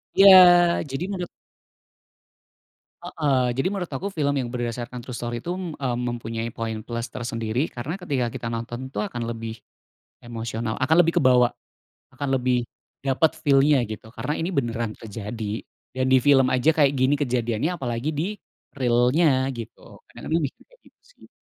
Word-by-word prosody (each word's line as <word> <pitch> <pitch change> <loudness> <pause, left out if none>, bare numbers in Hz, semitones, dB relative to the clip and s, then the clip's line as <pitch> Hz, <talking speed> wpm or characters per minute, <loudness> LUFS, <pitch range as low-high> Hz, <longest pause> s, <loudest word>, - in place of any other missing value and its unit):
Ya 195 0 +8 0.6
jadi 135 +6 -3
menurut 180 -3 -3 1.8
Heeh, 130 -5 0
jadi 135 +8 0
menurut 190 -4 -4
aku 190 +9 -3
film 145 -6 0
yang 120 - -4
berdasarkan 120 0 -5
true 130 - -7
story 120 0 -4
itu, 175 +9 -4
mmm, 180 -4 -5 0.2
mempunyai 115 -1 -3
poin 110 -1 -4
plus 115 +1 -4
tersendiri 115 +3 -2
karena 130 +7 -5
ketika 145 -10 -2
kita 120 - -5
nonton 120 +3 -5
tuh 140 - -3
akan 120 - -6
lebih, 115 -1 -6 0.6
emosional 115 -1 -4
akan 160 +5 +3
lebih 165 - +1
kebawa, 125 -2 +5 0.7
akan 140 +2 -4
lebih 125 -1 0 0.3
dapet 140 +3 +2
feel-nya 140 -1 +4
gitu. 110 +1 -8
Karena 125 +7 -3
ini 170 +4 -2
beneran 120 -6 -1
terjadi, 110 0 -6 0.3
dan 130 0 +1
di 130 - +7
film 135 -1 +5
aja 130 +5 +3
kayak 145 -3 +4
gini 135 +1 +2
kejadiannya 125 +1 -1
apalagi 125 +2 -3
di-real-nya 135 - 0
gitu, 115 - -8 0.3
kadang-kadang 165 +1 -2
mikirnya 320 - -8
gitu - - -24
sih. - - -21
125 Hz, 145 wpm, -24 LUFS, 115-150 Hz, 1.8 s, Ya